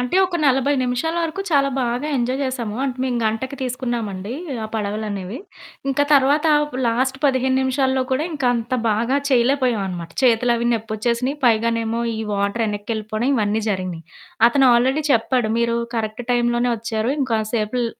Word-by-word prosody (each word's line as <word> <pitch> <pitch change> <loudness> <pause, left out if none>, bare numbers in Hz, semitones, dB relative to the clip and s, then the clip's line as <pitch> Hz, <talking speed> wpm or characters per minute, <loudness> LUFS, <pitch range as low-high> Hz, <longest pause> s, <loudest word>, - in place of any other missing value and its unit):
అంటే 250 +8 0
ఒక 355 -2 -2
40 270 +1 +3
నిమిషాల 250 +7 -1
వరకు 335 +4 -3
చాలా 280 -2 +3
బాగా 245 +4 -1
ఎంజాయ్ 255 +2 -1
చేశాము. 245 -5 -3
అంటే, 260 -2 -2
మేము 250 -2 -1
గంటకి 225 +5 -2
తీసుకున్నామండి, 235 -5 -3 0.3
ఆ - - -3
పడవలనేవి. 210 0 -3 0.5
ఇంకా 280 +1 +2
తర్వాత 285 +3 +3 0.4
లాస్ట్ 260 +3 0
15 260 -1 +2
నిమిషాల్లో 265 0 +1
కూడా 270 +4 +1
ఇంకా 280 -4 -2
అంత 235 +1 -2 0.2
బాగా 230 +5 +1
చేయలేకపోయాం 250 -3 +2
అనమాట. 175 -3 -6
చేతులవి 235 -1 +3
నొప్పొచ్చేసినయి 235 +4 -1
పైగానేమో 230 0 +1 0.2
ఈ - - -5 0.2
వాటర్ 200 +3 0
యెనక్కెళ్ళిపోవడం 215 +2 -3
ఇవన్నీ 215 -2 0
జరిగినయి. 185 -4 -4 0.4
అతను 270 +2 +3
ఆల్రెడీ 260 +5 +2
చెప్పాడు. 235 -1 +1
"మీరు 235 0 +1 0.2
కరెక్ట్ 220 +1 -3
టైంలోనే 240 0 +1
వచ్చారు 225 0 -2
ఇంకాసేపుల్ 225 -1 -1
240 Hz, 140 wpm, -21 LUFS, 220-260 Hz, 0.5 s, 40